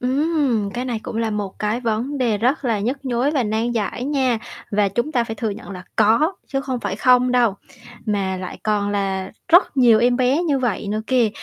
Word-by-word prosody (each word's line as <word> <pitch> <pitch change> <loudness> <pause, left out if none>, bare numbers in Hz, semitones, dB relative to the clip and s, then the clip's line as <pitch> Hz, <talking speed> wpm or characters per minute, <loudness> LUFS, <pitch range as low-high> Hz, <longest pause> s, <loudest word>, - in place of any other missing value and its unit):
Ừm, 260 -5 +1
cái 245 +1 -2
này 240 -3 -2
cũng - - -6
là 225 -1 0
một 205 -2 -4
cái 215 +3 -1
vấn 235 +5 -2
đề 230 -5 +1
rất 260 +5 +1
là 225 -4 +1
nhức 265 +6 -3
nhối 255 +3 +1
và 280 -5 +1
nan 220 +2 -1
giải 230 +2 -2
nha, 265 -5 +1 0.3
và 205 -1 +2
chúng 240 +10 -2
ta 240 -2 +2
phải 225 - -5
thừa 225 -1 -2
nhận 200 0 -8
là 180 -2 -8
có, 230 - +4
chứ 270 -1 -2
không 260 -3 -3
phải 205 -1 -3
không 250 +1 +4
đâu, 235 -5 +3 0.5
mà 195 -3 -1
lại 185 -1 -7
còn 205 -1 0
là 195 -2 -2 0.2
rất 345 -4 +5
nhiều 235 -4 +6
em 245 +1 +3
bé 260 +6 +2
như 290 -5 +1
vậy 230 -5 -2
nữa 215 +1 -1
kìa, 250 -4 +3
235 Hz, 220 wpm, -21 LUFS, 210-260 Hz, 0.5 s, nhiều